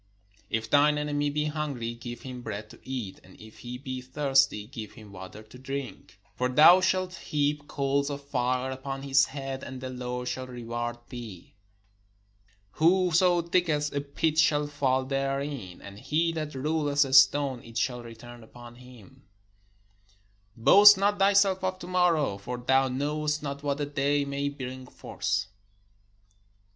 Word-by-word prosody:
If 110 0 -2
thineenemy 145 +1 +2
be 150 +1 -1
hungry, 145 -6 -3
give 120 0 -9
him 125 -1 -7
bread 105 -2 -6
to - - -15
eat; 125 -8 -6
and 95 - -18
if 110 0 -14
he 125 0 -7
be 130 -1 -6
thirsty, 135 -4 +1
give 110 -2 -9
him 110 -4 -14
water 95 +3 -10
to 110 +4 -15
drink: 130 -6 -7 0.2
For 125 0 0
thou 155 +8 +7
shalt 185 0 0
heap 145 -3 -2
coals 140 +1 -1
of 140 0 -6
fire 130 -1 -1
upon 135 +1 -6
his 135 0 +4
head, 135 -1 -6
and 130 0 -7
the 130 0 -6
Lord 125 0 -5
shall 130 +1 -4
reward 120 -1 -5
thee. 115 -8 -9 1.2
Whoso 175 - +3
diggeth 165 -4 0
a 140 - -1
pit 150 +2 -1
shall 150 -1 +3
fall 135 -3 0
therein: 135 -6 -3
and 100 0 -10
he 165 +6 0
that 155 -3 -5
rolleth 145 0 +1
a 135 - -5
stone, 135 -1 +5
it 115 0 -9
will 125 -2 -8
return 120 +1 -12
upon 120 +1 -13
him. 125 -6 -16 1.3
Boast 200 - +8
not 200 +1 +1
thyself 195 -1 +3
of 185 0 -1
to 185 - -9
morrow; 170 - +1
for 125 +5 -5
thou 130 +2 +2
knowest 150 +3 -2
not 140 -1 -5
what 145 0 -2
a 145 - -1
day 145 0 0
may 140 0 -2
bring 130 -2 -8
forth. - - -3
135 Hz, 155 wpm, -27 LUFS, 125-150 Hz, 1.3 s, Boast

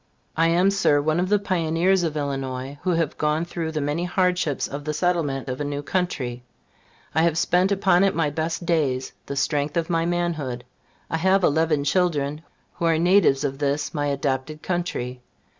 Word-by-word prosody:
I 165 +1 +3
am, 175 +4 +3
Sir, 195 -7 +3
one 155 +3 +1
of 185 +1 0
the 210 - +4
pioneers 180 -1 +1
of 160 -3 -2
Illinois, 135 -1 -4
who 185 - -2
have 165 -2 -1
gone 155 +2 +1
through 170 -2 -4
the 155 -1 -2
many 145 +4 -1
hardships 180 -5 0
of 140 +1 -6
the 150 +1 -3
settlement 155 -7 0
of 130 +2 -4
a - - 0
new 145 0 -3
country. 135 -10 -2 0.7
I 160 - +3
have 165 -1 +2
spent 180 +3 +2
upon 190 -2 +3
it 195 -1 +2
my 155 -3 +1
best 160 +3 -3
days, 140 -6 0 0.2
the 140 - -4
strength 145 +2 0
of 170 +1 -1
my 165 0 +1
manhood. 160 -8 -2 0.5
I 160 - +1
have 190 +3 +3
eleven 155 -2 +2
children, 150 -2 0 0.3
who 170 - -3
are 165 -1 +3
natives 170 -5 +4
of 135 -1 -2
this 145 0 -1
my 145 -1 -1
adopted 140 +2 -2
country. 150 -9 -3
160 Hz, 185 wpm, -24 LUFS, 145-175 Hz, 0.7 s, the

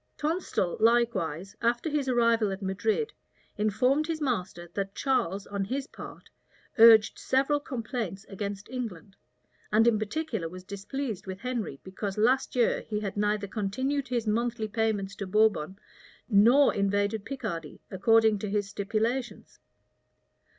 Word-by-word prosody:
Tonstal, 305 - -1
likewise, 215 -7 +1
after 240 +5 +1
his 295 -3 -1
arrival 230 -4 +3
at 195 +1 -5
Madrid, 210 - -1 0.4
informed 250 +8 +1
his 325 -2 -2
master 185 - -2
that 195 0 -3
Charles, 200 -8 0
on 200 -1 -3
his 265 +7 -3
part, - - -11 0.5
urged 225 -1 +7
several 275 +3 +1
complaints 230 - -5
against 200 0 -5
England; 215 -6 -6 0.6
and 220 +2 +4
in 220 -3 +4
particular 220 - -3
was 185 +2 -10
displeased 210 +3 -5
with 190 0 -5
Henry, 235 - -3
because 195 +1 -5
last 250 +6 +2
year 240 -2 +2
he 210 -1 -3
had 200 -2 -4
neither 210 0 0
continued 260 +8 -2
his 240 -2 -1
monthly 225 +1 0
payments 210 -3 -1
to 200 - -4
Bourbon 195 -4 +2 0.5
nor 240 +6 +5
invaded 205 +1 0
Picardy, 205 - -5
according 220 +1 +4
to 210 - -4
his 205 0 0
stipulations. 225 +5 -3
215 Hz, 135 wpm, -28 LUFS, 200-245 Hz, 0.6 s, urged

